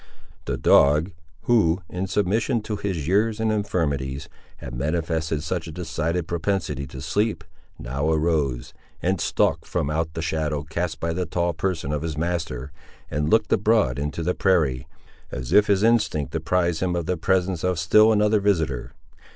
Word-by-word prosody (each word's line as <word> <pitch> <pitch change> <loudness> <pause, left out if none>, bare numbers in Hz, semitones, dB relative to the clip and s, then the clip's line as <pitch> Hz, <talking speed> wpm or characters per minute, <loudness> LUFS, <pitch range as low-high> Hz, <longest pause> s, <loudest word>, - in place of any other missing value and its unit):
The - - -2
dog, 75 +6 +4 0.3
who, 95 -7 +2
in 90 +3 -4
submission 110 +5 0
to 105 - -3
his 95 -8 -3
years 105 +4 +2
and 110 0 +1
infirmities, 70 -10 -2 0.3
had - - -8
manifested 80 +2 -1
such 85 0 -3
a - - -6
decided 80 0 -2
propensity 85 -6 -2
to 65 +2 -9
sleep, 105 -2 0 0.3
now 70 +5 -2
arose, 75 -6 0 0.3
and 95 0 +1
stalked - - +1
from 70 - -1
out 80 +1 -2
the 80 - -3
shadow 75 -2 -1
cast 80 +1 -3
by 85 0 -1
the 90 0 -2
tall 85 0 0
person 80 -3 -2
of 75 -1 -1
his 80 -2 -4
master, 80 -6 -3 0.4
and 75 +1 -1
looked 110 +6 +3
abroad 105 - +2
into 75 +3 -3
the 90 +2 +1
prairie, 75 -11 +1 0.4
as 60 -1 -4
if 105 0 +6
his 100 -1 +2
instinct 105 - +2
apprised 85 +1 0
him 90 -1 0
of 85 -2 -2
the 90 - 0
presence 90 0 0
of 90 -1 +1
still 105 +7 +5
another 105 0 +3
visitor. 80 -11 0
85 Hz, 165 wpm, -24 LUFS, 75-95 Hz, 0.4 s, if